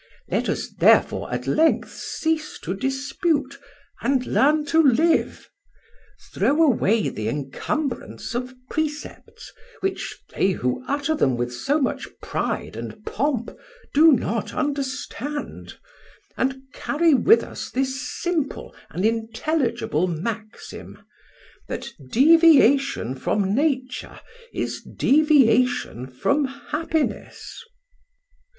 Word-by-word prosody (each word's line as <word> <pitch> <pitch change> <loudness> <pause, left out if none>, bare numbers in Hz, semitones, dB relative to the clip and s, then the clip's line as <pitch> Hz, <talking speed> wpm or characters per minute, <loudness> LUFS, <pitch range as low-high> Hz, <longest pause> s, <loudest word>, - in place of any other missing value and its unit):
Let - - 0
us - - -2
therefore - - +3
at - - -3
length 320 +1 +2
cease 315 -1 -3
to 175 - -3
dispute, 275 - -1 0.4
and 265 -2 +1
learn 295 +4 +3
to 320 +2 +4
live: 315 +4 +2 0.9
throw 300 +4 +3
away 225 -6 +3
the 110 0 -3
encumbrance 225 - -4
of 250 +1 -4
precepts, 300 0 -5 0.3
which 385 0 -3
they 190 - +2
who 125 - -2
utter 285 +2 0
them 130 - +1
with 120 0 -2
so 280 - 0
much 265 - -1
pride - - -3
and 215 - -8
pomp 255 -2 -1 0.4
do 315 +3 +7
not 230 -4 -1
understand, 285 0 -4 0.6
and 265 0 -1
carry 325 +1 +2
with 405 - +5
us - - -7
this 265 0 -2
simple 300 0 -3 0.2
and 180 +6 -2
intelligible 230 - 0
maxim: 215 +6 -6 0.7
that - - -5 0.2
deviation 280 - +5
from 195 +9 -1
Nature 260 -1 -1 0.3
is - - -3
deviation 255 - +2
from 280 - 0
happiness." 300 - -4
270 Hz, 105 wpm, -23 LUFS, 225-305 Hz, 0.9 s, do